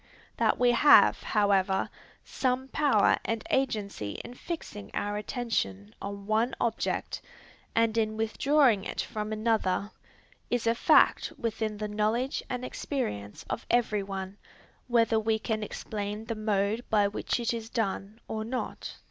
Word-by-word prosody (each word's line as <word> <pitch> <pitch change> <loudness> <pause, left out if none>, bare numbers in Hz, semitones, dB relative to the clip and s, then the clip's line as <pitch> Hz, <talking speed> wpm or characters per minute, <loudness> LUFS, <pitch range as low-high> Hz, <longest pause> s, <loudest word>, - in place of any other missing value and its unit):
That - - +2
we 245 -1 +4
have, 265 +5 +6
however, 195 -2 +2 0.4
some 260 0 -1
power 270 -10 +3
and 225 -1 -2
agency 205 - -1
in - - -8
fixing 250 - -7
our 205 0 -1
attention 205 - -2
on 200 0 -6
one 220 +4 +1
object 230 -2 -1 0.5
and 230 -1 +3
in 215 -1 0
withdrawing 230 0 +3
it - - -3
from 215 0 -4
another, 215 -2 0 0.6
is 245 -2 0
a 230 - +4
fact 235 - +4
within 220 -4 -2
the 210 0 -3
knowledge 215 +5 0
and 250 0 -3
experience 105 - -4
of - - -4
every 220 -4 +2
one, 195 0 -6 0.5
whether 230 -2 +3
we 220 0 +1
can 220 0 -2
explain 210 0 -5
the 230 - -2
mode 215 +1 0
by 205 -2 +4
which 205 +4 -2
it 235 0 0
is 225 -1 -5
done 215 -1 -2
or 220 0 -3
not. 250 +3 -4
220 Hz, 140 wpm, -29 LUFS, 205-235 Hz, 0.6 s, have